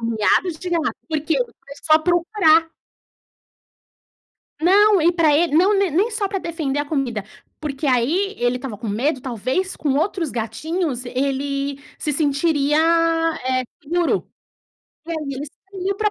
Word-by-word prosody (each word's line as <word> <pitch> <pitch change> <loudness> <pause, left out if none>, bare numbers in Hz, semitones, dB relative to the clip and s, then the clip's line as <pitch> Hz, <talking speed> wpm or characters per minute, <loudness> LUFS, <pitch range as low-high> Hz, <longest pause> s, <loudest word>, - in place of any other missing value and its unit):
Miados 230 - +1
de 365 - -5
gato, 330 -3 0
porque 310 +1 0 0.2
foi 280 - -12
só 310 0 +6
procurar 335 -1 +3 1.9
Não, 400 +3 +5
e 340 +3 +4
pra 325 -4 +3
ele 330 -2 +1
não, 380 +6 +4
ne 390 -2 +2
nem 390 +10 +1
só 430 -2 -1
pra 390 -1 -2
defender 315 -6 -3
a 290 - 0
comida, 265 -9 -2 0.4
porque 290 -1 -4
aí 310 - +1
ele 245 +1 +1
estava 250 -4 -6
com 220 +1 -6
medo, 260 +7 0
talvez, 260 - -2
com 285 -3 0
outros 330 -1 0
gatinhos 255 - -3
ele 275 +2 -2 0.2
se 300 - -2
sentiria, 290 0 +1 0.7
eh, 255 0 +1 0.2
seguro. 340 +3 0 0.8
E 335 - -7
aí 330 - -1 0.2
ele 280 +3 -5
saiu 385 +5 -5
pra 425 0 +1
310 Hz, 145 wpm, -21 LUFS, 270-350 Hz, 1.9 s, só